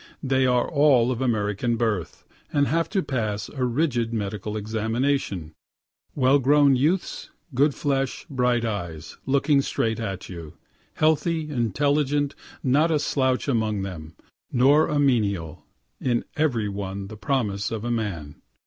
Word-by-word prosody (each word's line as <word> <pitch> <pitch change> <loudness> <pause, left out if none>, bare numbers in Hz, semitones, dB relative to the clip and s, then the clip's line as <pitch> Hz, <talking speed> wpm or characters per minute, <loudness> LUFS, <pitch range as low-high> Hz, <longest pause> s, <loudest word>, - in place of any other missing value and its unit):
They 130 -1 +2
are 125 -1 +2
all 140 -5 +4
of 125 0 -3
American 115 -1 0
birth, 110 -7 -2 0.3
and 145 -1 +3
have 165 +5 0
to 195 -2 0
pass 110 -8 -2
a 135 -3 -4
rigid 125 -2 0
medical 105 -1 -3
examination; 110 - -1 0.6
well 135 +1 +4
grown 140 +1 +5
youths, 160 +8 0 0.2
good 140 +3 +3
flesh, 135 -2 -1
bright 125 -3 +1
eyes, 85 -7 -5
looking 140 +1 +3
straight 115 -4 -1
at 95 -5 -4
you, 85 -3 -9 0.4
healthy, 160 0 +1
intelligent, 145 +4 +1 0.3
not 145 +5 +3
a 160 - +3
slouch 130 -3 0
among 110 -6 0
them, 80 -5 -7 0.4
nor 140 +5 +4
a 150 - -1
menial 100 - 0 0.3
in 120 -2 0
every 130 -9 +1
one 100 -1 -4
the 110 - -9
promise 105 -5 -1
of 110 0 -4
a 120 - -1
man. 95 -11 -4
120 Hz, 140 wpm, -24 LUFS, 105-140 Hz, 0.6 s, grown